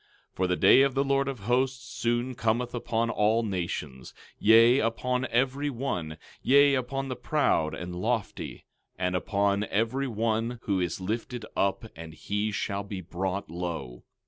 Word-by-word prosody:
12:12 - - -45
For 95 - +1
the 90 - +1
day 130 - +6
of 135 -1 +2
the 135 - +2
Lord 140 0 +1
of 135 -6 -4
Hosts 125 +4 0
soon 120 +1 -1
cometh 120 +1 -1
upon 115 -1 -1
all 110 +2 +2
nations, 85 - -4 0.2
yea, 115 +4 +6
upon 125 +3 0
every 135 +4 +1
one; 100 - -3 0.2
yea, 140 +1 +5
upon 135 +1 -2
the 130 - -3
proud 120 - +1
and 90 0 -6
lofty, 110 +4 -3 0.3
and 90 0 -1
upon 100 +2 +1
every 115 +7 0
one 115 +1 -1
who 100 -2 0
is 90 0 -2
lifted 115 +4 -4
up, 100 +2 0
and 80 -1 -9
he 105 +6 -2
shall 100 -1 -2
be 100 -1 -6
brought 95 +1 -4
low. 85 -8 -5
115 Hz, 160 wpm, -28 LUFS, 95-125 Hz, 0.3 s, day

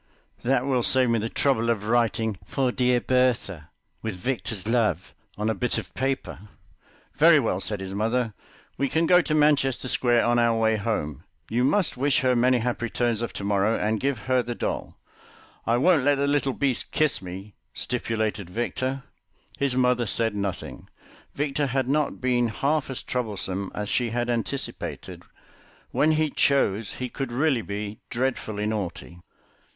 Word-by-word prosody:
That 130 0 +1
will 130 -3 +1
save 130 0 +3
me 115 - +2
the 110 +2 -2
trouble 115 -4 +1
of 110 -3 0
writing: 115 -3 +1
'For 130 -3 0
dear 125 0 +2
Bertha, 120 - 0 0.3
with 110 -3 -3
Victor's 110 -1 -3
love,' 110 -7 0 0.2
on 105 +1 -1
a 110 - +2
bit 125 +4 -1
of - - -6
paper." 130 -6 -3 0.7
"Very 160 +1 +7
well," 110 -8 0
said 100 +1 -2
his 95 0 -5
mother, 115 +2 0 0.5
"we 140 0 +1
can 160 +4 +2
go 180 +1 +6
to 155 -2 -1
Manchester 140 -4 +2
Square 120 -1 +2
on 120 0 +3
our 115 -1 +3
way 110 0 +3
home. 100 - -3 0.3
You 120 +2 +2
must 175 +2 +2
wish 140 +1 +2
her 130 -1 +3
many 125 +1 +4
happy 120 0 -1
returns 120 -1 0
of 120 - -3
to - - -6
morrow, 100 +2 +2
and 110 +1 0
give 135 -3 -1
her 130 +1 +2
the 120 0 -5
doll." - - -4 0.7
"I 115 +1 +3
won't 155 +1 +4
let 145 +1 +4
the 140 +1 0
little 140 -2 +1
beast 135 -3 -1
kiss 155 -2 +1
me," 95 +3 -8 0.2
stipulated 110 -5 -2
Victor. 130 +5 -2 0.6
His 140 -2 +1
mother 125 -2 +2
said 115 -1 +1
nothing; 100 -2 -4 0.5
Victor 145 0 0
had 130 -1 0
not 150 +2 0
been 125 -2 +2
half 140 +6 0
as 130 - -4
troublesome 100 -5 -3
as 105 0 -3
she 120 +3 0
had 120 +1 -1
anticipated. 120 +4 -3 0.7
When 155 +1 +3
he 155 -1 +1
chose 110 -7 +1
he 125 - -4
could 135 0 -5
really 135 0 +2
be 105 0 -5
dreadfully 120 -4 -2
naughty. 90 -5 -4
120 Hz, 165 wpm, -25 LUFS, 110-135 Hz, 0.7 s, Very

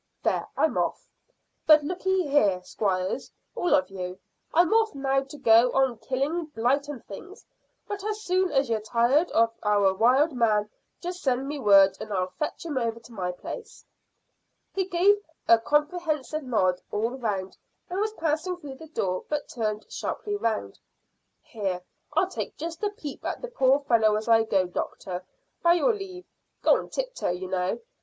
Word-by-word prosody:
There, - - 0
I'm - - +2
off. - - -2 0.6
But 305 -1 +8
lookye 365 +2 0
here, 205 -11 +3
squires, 185 -2 -2 0.2
all 350 -4 +2
of 280 -8 0
you. 180 -1 -5 0.3
I'm 345 +4 +4
off 445 -6 +3
now 270 0 +1
to 285 +2 -11
go 235 -2 +5
on 265 -4 +2
killing 285 +6 -1
blight 280 0 0
and 285 -5 -7
things, 370 - -11 0.4
but 405 -1 -5
as 425 0 -3
soon 370 0 +1
as 270 -1 +2
you're 225 -1 0
tired 240 +9 +2
of 230 0 +3
our 205 -2 +3
wild 255 +10 +4
man, 215 -4 +2 0.3
just 360 +1 -5
send 265 0 0
me 290 0 -4
word, 195 -4 +6
and 215 - -7
I'll 185 -2 -1
fetch 300 - -3
him 295 -5 -1
over 230 -1 -2
to 230 +1 -16
my 180 -4 -2
place." 455 - -9 0.9
He 385 -1 0
gave 380 +3 +4 0.3
a 230 - +7
comprehensive 305 0 0
nod 190 -9 +1
all 220 +3 -1
round 210 -7 -3 0.3
and 365 +2 -3
was 430 +1 0
passing 330 0 -1
through 285 -6 -9
the 320 - -11
door, 185 -11 -2
but 300 -1 -2
turned 215 -2 -2
sharply 415 -1 -3
round. 220 - -2 0.6
"Here, 195 -5 -3 0.3
I'll - - +3 0.3
just 330 +1 -5
take 415 -1 0
a - - -26
peep 290 -3 -7
at - - -4
the - - -4
poor 275 - +3
fellow 225 -5 +3
as 215 +1 -3
I 225 -1 +5
go, 195 -4 +2
doctor, 180 0 -5 0.4
by 340 0 +5
your 465 +7 +3
leave 375 -3 -7 0.4
Go - - +6
on - - -4
tip - - -3
toe, - - -2
you 180 +1 -3
know. 180 0 -1
265 Hz, 175 wpm, -26 LUFS, 215-335 Hz, 0.9 s, But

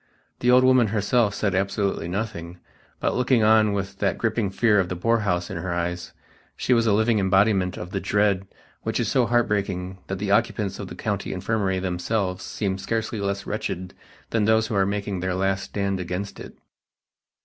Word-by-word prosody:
The 125 - +1
old 125 +1 +6
woman 130 -3 +5
herself 105 +1 +1
said 100 -2 0
absolutely 95 -2 -1
nothing, 90 -3 -4 0.4
but - - 0
looking 125 -2 +3
on 110 -1 +5
with 100 -1 -4
that 100 - 0
gripping 110 -3 0
fear 105 +1 +3
of 90 -2 0
the 90 - -3
poorhouse 95 -3 0
in 95 - -4
her 85 0 -3
eyes, 85 +1 -3 0.5
she 125 - +1
was 115 -1 +3
a - - +4
living 110 +1 +3
embodiment 95 -1 +2
of 90 +1 -7
that 95 - -1
dread 100 -2 +1 0.3
which - - -2
is - - 0
so 125 -3 +3
heartbreaking 100 -6 0
that 95 - -3
the 100 +1 -2
occupants 105 -2 +1
of 100 - -5
the - - -8
County 100 -2 -3
Infirmary 95 0 -1
themselves 95 +1 -2
seem 95 -2 -3
scarcely 110 +1 -2
less 100 -1 -2
wretched 100 -4 -4 0.4
than 110 -2 +2
those 110 0 +3
who 110 - -3
are 95 -1 +3
making 100 -1 -2
their 90 0 -1
last 95 0 0
stand 100 -2 -2
against 90 +3 -4
it. - - -10
100 Hz, 185 wpm, -24 LUFS, 95-110 Hz, 0.5 s, old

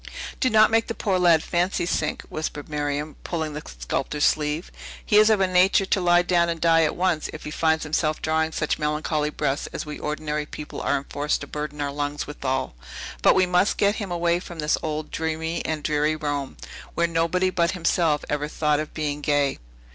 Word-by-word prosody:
"Do 255 - +2
not 220 -1 +5
make 225 0 +3
the 230 - -4
poor 190 -4 0
lad 170 -3 +5
fancy 175 +1 0
sink," 155 -3 -1
whispered 150 -2 -5
Miriam, 145 0 -3
pulling 160 -3 -3
the 150 - -5
sculptor's 65 - -2
sleeve. 150 +2 0 0.3
"He 210 - +4
is 215 +1 +7
of 215 -2 +4
a 190 - +4
nature 185 +2 +4
to 190 - +1
lie 175 0 +4
down 175 -1 +2
and 165 -1 -2
die 165 0 +4
at 150 - -1
once, 175 -4 0
if 155 - -8
he 150 - -6
finds 160 0 +1
himself 155 0 0
drawing 160 0 0
such 155 -1 -1
melancholy 150 0 0
breaths 140 -1 -2
as - - -5
we 150 0 -7
ordinary 150 0 -3
people 150 -1 -7
are - - +1
enforced 145 +2 -2
to - - -5
burden 150 0 -5
our 140 -1 -1
lungs 145 +1 -3
withal. 135 - -3 0.5
But - - +5
we 185 - +4
must 180 +3 +2
get 200 +1 +2
him 200 -3 -4
away 170 0 +1
from 175 -1 -10
this 150 -1 +1
old, 155 0 -4
dreamy 160 +1 -2
and 155 -2 -2
dreary 150 +1 +1
Rome, 145 -3 -3 0.4
where 170 - +2
nobody 170 +3 +1
but 170 0 +1
himself 165 -3 +1
ever 150 0 -1
thought 150 -1 +1
of 155 - -5
being 150 -2 -2
gay. 145 -2 +1
155 Hz, 200 wpm, -24 LUFS, 150-175 Hz, 0.5 s, is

